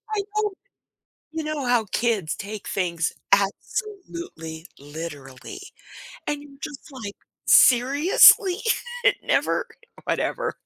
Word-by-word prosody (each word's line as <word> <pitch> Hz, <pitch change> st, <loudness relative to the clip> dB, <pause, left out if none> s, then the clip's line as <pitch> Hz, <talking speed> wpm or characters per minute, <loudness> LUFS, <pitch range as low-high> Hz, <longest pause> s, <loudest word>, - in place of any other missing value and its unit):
I 405 Hz, -, +1 dB
know, 425 Hz, -1 st, +1 dB, 0.8 s
you 320 Hz, -1 st, -4 dB
know 300 Hz, -4 st, -3 dB
how 240 Hz, -3 st, +2 dB
kids 215 Hz, -8 st, 0 dB
take 205 Hz, +1 st, -7 dB
things 170 Hz, -4 st, -1 dB, 0.2 s
absolutely 200 Hz, -, -2 dB
literally, 145 Hz, -, -9 dB, 0.7 s
and 295 Hz, -1 st, -2 dB
you're 275 Hz, -1 st, -16 dB
just 300 Hz, -1 st, -8 dB
like, 220 Hz, -6 st, -7 dB, 0.3 s
"Seriously?" 300 Hz, -, +6 dB, 0.4 s
It -, -, +5 dB
never -, -, +1 dB, 0.4 s
whatever. -, -, -2 dB
245 Hz, 100 wpm, -24 LUFS, -, 0.8 s, Seriously